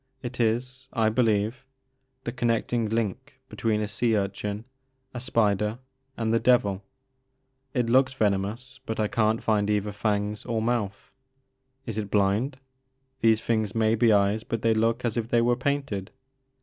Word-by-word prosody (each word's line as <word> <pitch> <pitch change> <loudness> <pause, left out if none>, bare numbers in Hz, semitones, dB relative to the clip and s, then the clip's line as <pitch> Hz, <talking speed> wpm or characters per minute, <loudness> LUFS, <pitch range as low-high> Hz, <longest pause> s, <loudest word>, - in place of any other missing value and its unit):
It 125 0 -6
is, 125 +3 -1
I 110 -3 +2
believe, 110 +1 +1 0.6
the 120 - -3
connecting 120 -2 0
link 115 +5 -3
between 110 -2 0
a 105 - -1
sea 110 +2 +1
urchin, 100 +2 -3 0.5
a 120 - -4
spider, 105 -3 +1 0.4
and 115 -1 0
the 115 - +4
devil. 100 -6 +2 0.9
It 125 -2 +1
looks 130 +2 +3
venomous 110 +4 -1
but 110 - -3
I 105 - +2
can't 110 +1 +1
find 105 -2 +1
either 105 0 0
fangs 105 0 -1
or 115 -2 -1
mouth. 110 -3 -2 0.7
Is 110 -3 -3
it 105 -2 -4
blind? 105 +7 +1 0.6
These 110 -2 +4
things 110 -3 0
may 110 -1 +3
be 115 0 +4
eyes 100 +1 +3
but 115 -2 -4
they 115 -1 +4
look 115 +3 +1
as 120 0 -1
if 115 -1 -1
they 120 - +3
were 120 +1 +3
painted. 130 -7 -2
110 Hz, 155 wpm, -26 LUFS, 105-120 Hz, 0.9 s, the